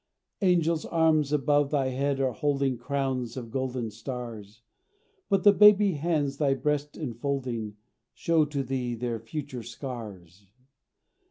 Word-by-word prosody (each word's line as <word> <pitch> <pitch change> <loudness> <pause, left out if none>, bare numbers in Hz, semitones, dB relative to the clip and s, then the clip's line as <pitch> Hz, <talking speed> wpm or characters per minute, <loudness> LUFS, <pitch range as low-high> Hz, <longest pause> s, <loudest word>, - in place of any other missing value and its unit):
Angels' 170 -4 +2
arms 160 -3 +2
above 145 -1 +2
thy 140 -3 +1
head 135 +2 -1
are 135 -1 +1
holding 140 +1 0
Crowns 130 -1 -2
of 115 -3 -7
golden 130 -3 -2
stars; 115 -4 -8 0.7
But 195 -2 +2
the 205 - +8
baby 210 -1 +7
hands 150 -3 -1
thy 140 -3 +2
breast 150 +1 -2
enfolding 120 -5 -3 0.4
Show 165 -2 +2
to 145 -2 -3
thee 125 -2 -2
their 115 -1 -3
future 130 +2 -6
scars. 105 - -9
135 Hz, 125 wpm, -27 LUFS, 120-150 Hz, 0.7 s, the